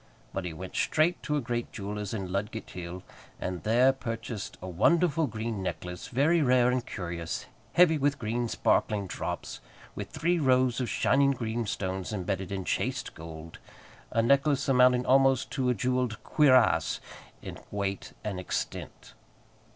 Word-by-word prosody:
But 95 -1 -3
he 90 - -3
went 95 +4 -8
straight 160 +3 +2
to 150 - -1
a - - 0
great 120 -1 -3
jeweller's 105 -1 -5
in 95 -5 -4
Ludgate 105 +3 -3
hill, 90 0 -7 0.4
and 90 -1 -4
there 125 +5 +4
purchased 115 -4 -5
a 95 - -7
wonderful 155 - +3
green 110 -2 -4
necklace, 90 0 -5
very 155 +7 +3
rare 125 -2 +4
and 125 -1 0
curious, 85 -6 -5 0.3
heavy 165 -3 +5
with 145 +1 +1
green 120 +2 -1
sparkling 105 -2 +1
drops, 90 - -5 0.3
with - - -6
three 175 +2 0
rows 130 -3 +3
of 125 - -2
shining 140 +1 +3
green 115 -2 -3
stones 95 -1 -3
embedded 95 -1 -3
in 95 -2 -3
chaste - - -2
gold, 80 0 -10 0.5
a 115 - +1
necklace 140 +3 +3
amounting 125 -1 +5
almost 135 -1 +4
to 130 -3 0
a 125 - +2
jewelled 125 0 -1
cuirass 130 - +4 0.4
in - - -7
weight 100 -1 -3
and 100 -4 -3
extent. 90 - -5
115 Hz, 150 wpm, -29 LUFS, 95-130 Hz, 0.5 s, heavy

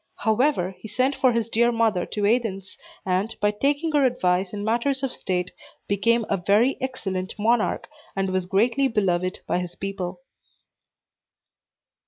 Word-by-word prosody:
However, 220 -4 +1
he - - -8
sent 255 +5 +1
for 260 -2 +3
his 230 -1 0
dear 235 +1 +3
mother 225 -6 +1
to 205 -1 -2
Athens, 205 -4 0 0.3
and, 190 +4 0
by 205 -1 +2
taking 285 +9 0
her 295 -2 +3
advice 185 -7 +1
in 205 -1 -5
matters 240 +5 0
of 270 - 0
state, 180 -1 -2 0.4
became 225 +3 +2
a 200 - +1
very 205 +8 +3
excellent 195 -9 -3
monarch, 225 +1 +1 0.3
and 195 -1 -1
was 185 -1 -1
greatly 235 +8 +2
beloved 185 -5 0
by - - 0
his 180 -1 -5
people. 185 -2 -5
210 Hz, 150 wpm, -24 LUFS, 185-240 Hz, 0.4 s, for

